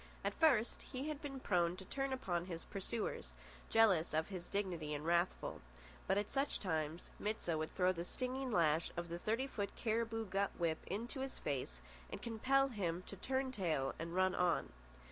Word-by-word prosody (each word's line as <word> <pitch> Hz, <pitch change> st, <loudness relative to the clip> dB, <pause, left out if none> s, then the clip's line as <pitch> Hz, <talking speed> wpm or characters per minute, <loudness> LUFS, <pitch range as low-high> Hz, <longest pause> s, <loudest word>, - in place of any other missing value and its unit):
At -, -, 0 dB
first 250 Hz, -8 st, +4 dB
he 270 Hz, +3 st, -4 dB
had 300 Hz, -1 st, -4 dB
been 275 Hz, -3 st, -5 dB
prone 175 Hz, -6 st, +2 dB
to 190 Hz, -, -8 dB
turn 270 Hz, +6 st, -1 dB
upon 180 Hz, -10 st, -1 dB
his 170 Hz, -3 st, -5 dB
pursuers, 195 Hz, -, -3 dB, 0.4 s
jealous 195 Hz, -9 st, +5 dB
of 160 Hz, +3 st, +1 dB
his 180 Hz, -3 st, -5 dB
dignity 175 Hz, -7 st, -1 dB
and 145 Hz, +1 st, -4 dB
wrathful; 170 Hz, +2 st, +1 dB, 0.5 s
but 190 Hz, -, +3 dB
at 205 Hz, 0 st, 0 dB
such 275 Hz, +1 st, +1 dB
times 160 Hz, -2 st, -2 dB
Mit 215 Hz, +1 st, -1 dB
sah 170 Hz, -, 0 dB
would 155 Hz, 0 st, -1 dB
throw 185 Hz, -1 st, +3 dB
the 170 Hz, -2 st, -3 dB
stinging 255 Hz, +6 st, -2 dB
lash 165 Hz, -6 st, +3 dB
of 175 Hz, 0 st, -2 dB
the 170 Hz, +1 st, -3 dB
thirty 225 Hz, +7 st, +1 dB
foot 205 Hz, -7 st, -3 dB
cariboo 225 Hz, 0 st, 0 dB
gut 195 Hz, 0 st, +1 dB
whip 165 Hz, -2 st, +1 dB
into 230 Hz, -, -3 dB
his 265 Hz, 0 st, -3 dB
face 125 Hz, -, -2 dB, 0.3 s
and -, -, -5 dB
compel 270 Hz, +4 st, +3 dB
him 180 Hz, -6 st, -1 dB
to -, -, -7 dB
turn 260 Hz, +6 st, 0 dB
tail 160 Hz, -, 0 dB
and 165 Hz, +1 st, -4 dB
run 185 Hz, 0 st, +4 dB
on. 180 Hz, -1 st, +2 dB
190 Hz, 185 wpm, -38 LUFS, 170-235 Hz, 0.5 s, jealous